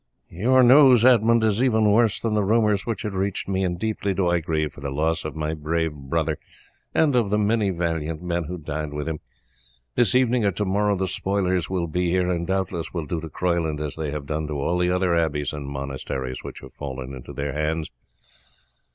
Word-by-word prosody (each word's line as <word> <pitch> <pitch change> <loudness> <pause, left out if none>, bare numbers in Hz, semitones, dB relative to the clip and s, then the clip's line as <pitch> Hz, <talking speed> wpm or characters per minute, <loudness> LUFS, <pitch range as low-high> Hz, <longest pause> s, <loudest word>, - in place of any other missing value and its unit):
"Your 125 +9 +3
news, 125 -2 +7
Edmund, 115 -2 +5
is 110 +1 +2
even 110 -5 +3
worse 110 -1 +3
than 115 -2 -1
the 105 -1 +2
rumours 105 0 +2
which 115 -5 -2
had 105 - -3
reached 95 0 -2
me, 95 0 0
and 90 -1 -1
deeply 100 -1 -2
do 95 -2 +1
I 85 0 +2
grieve 80 -2 -2
for 70 - -13
the 70 - -3
loss 80 +4 0
of 75 - -5
my 80 0 -2
brave 80 +1 -1
brother 75 +2 -2 0.5
and 150 -4 +2
of 115 -5 +2
the 105 - +2
many 105 0 +2
valiant 80 -3 -2
men 85 -1 -2
who 90 +4 -5
died 75 -1 -5
with 75 0 -4
him. 80 -2 -3 0.7
This 120 -2 +2
evening 125 -2 +3
or 100 - +3
to 105 +4 -2
morrow 100 +2 +1
the 95 0 -1
spoilers 95 -4 0
will 90 -2 -1
be 90 +2 -1
here, 90 0 +1
and 85 -1 -2
doubtless 95 -4 -2
will 85 -4 -3
do 80 +2 -3
to 80 - -7
Croyland 85 -2 -1
as 75 -2 -4
they 80 -2 -3
have 75 -1 -5
done 75 +1 -3
to 75 - -4
all 85 +5 0
the 90 0 +2
other 90 -1 +1
abbeys 75 -4 0
and 75 -2 -6
monasteries 70 -2 -5
which - - -8
have - - -12
fallen 65 -2 -6
into 65 +1 -9
their 70 0 -3
hands. 75 +1 -2
85 Hz, 215 wpm, -24 LUFS, 75-100 Hz, 0.7 s, news